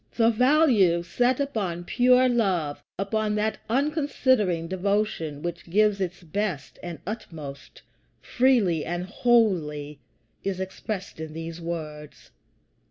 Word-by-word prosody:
The 230 -1 +4
value 235 - +4
set 245 +8 +1
upon 200 -11 -2
pure 250 +6 +4
love, 190 -12 0 0.2
upon 210 +2 -1
that 215 +1 -1
unconsidering 260 - +1
devotion 190 -5 -1
which 170 0 -5
gives 205 +1 +3
its 180 -1 -3
best 175 -3 -3
and 175 -2 -6
utmost 160 -9 -8 0.4
freely 230 - +2
and 175 +2 -3
wholly, 175 - +1 0.4
is 195 -2 -2
expressed 190 0 -5
in 160 -1 -6
these 165 +1 -6
words. 155 -3 -7
190 Hz, 110 wpm, -26 LUFS, 165-230 Hz, 0.4 s, The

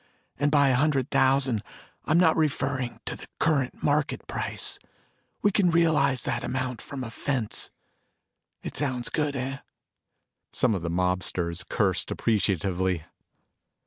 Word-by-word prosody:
And 145 +1 +3
by 140 -2 +4
a - - +3
hundred 140 -1 +1
thousand, 130 -4 +3 0.4
I - - -2
am 170 - +5
not 165 -3 +5
referring 135 -5 -1
to - - -3
the - - -11
current 140 -5 +1
market 145 0 +1
price. - - -1 0.6
We 205 - +4
can 190 -2 +3
realize 150 -6 +3
that - - -2
amount 125 -1 -3
from 135 -2 -6
a 115 - -6
fence. 125 -3 -1 0.9
It - - -6
sounds 130 -4 -1
good, 150 -2 -1
eh?" 135 +1 -3 0.9
Some 125 -3 +2
of 95 - -2
the 85 - -3
mobsters 90 -1 0
cursed 95 -4 +1
appreciatively. 95 -4 0
130 Hz, 140 wpm, -27 LUFS, 105-145 Hz, 0.9 s, am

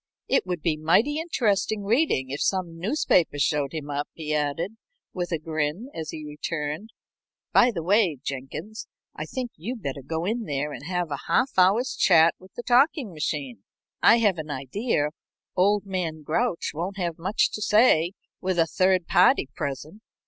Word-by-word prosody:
"It 270 - +1
would 175 -3 -3
be 160 -3 +1
mighty 210 - +2
interesting 220 - 0
reading 205 - +1
if 140 - -4
some 175 -4 -1
newspaper 180 - +2
showed 140 0 +1
him 150 -2 -5
up," 145 +1 -3
he 155 -2 -4
added, 155 +8 -1 0.4
with 175 -1 -3
a 165 - +1
grin, 155 - -3
as 160 -1 -5
he 155 -1 -6
returned. 150 +5 -4 0.6
"By 245 - +6
the 170 -9 -4
way, 190 -4 +3
Jenkins, 150 +11 -6 0.3
I - - -5
think 250 -2 -4
you'd 225 +7 -6
better 140 0 -4
go 160 +5 -3
in 225 +3 -1
there 145 0 -2
and 140 - -8
have 180 -3 -2
a 140 - -5
half 265 +1 +2
hour's 195 +8 +3
chat 165 -2 +5
with 185 0 -18
the 240 - -6
talking 255 - +3
machine. 140 - -4 0.4
I 230 - +7
have 205 -7 +2
an 155 0 -6
idea 145 - -1 0.5
old 200 +2 +3
man 170 -5 -3
Grouch 170 +5 -1
won't 180 +6 -4
have 170 -4 -3
much 190 +6 +1
to 215 - -5
say 205 -6 +4 0.3
with 185 -1 -1
a 165 - +4
third 185 +1 +2
party 180 - +4
present. 145 +9 -5
175 Hz, 170 wpm, -25 LUFS, 150-210 Hz, 0.6 s, I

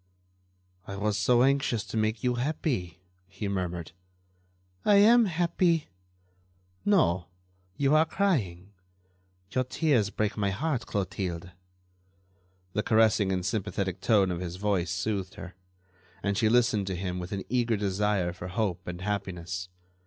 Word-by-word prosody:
"I 100 - -5
was 105 +1 0
so 120 +4 +4
anxious 135 -5 +2
to - - -8
make 110 0 0
you 125 -1 +2
happy," 120 - -2 0.3
he 100 +2 -5
murmured. 90 -4 -3 0.9
"I 205 - +5
am 225 +4 +7
happy." 170 -2 +1 0.9
"No; 95 - +2 0.5
you 140 +1 +2
are 155 +1 +5
crying.... 105 - -1 0.8
Your 130 - +1
tears 130 -5 +1
break 105 +1 -1
my 100 -2 0
heart, 125 +4 -2
Clotilde." 95 -3 -3 1.2
The 105 - +1
caressing 110 -3 +3
and 90 -1 -1
sympathetic 95 -3 -2
tone 100 -5 +3
of 85 - -3
his 90 -1 -4
voice 95 -3 0
soothed 95 +1 -2
her, 95 0 -9 0.7
and 100 0 0
she 110 +2 +2
listened 115 -4 +3
to 95 - -2
him 90 0 -3
with 90 +1 -6
an 100 -1 -3
eager 120 -2 +1
desire 100 -2 0
for 90 0 -7
hope 95 -1 -2
and 90 0 -5
happiness. 90 -3 -4
100 Hz, 140 wpm, -28 LUFS, 90-120 Hz, 1.2 s, am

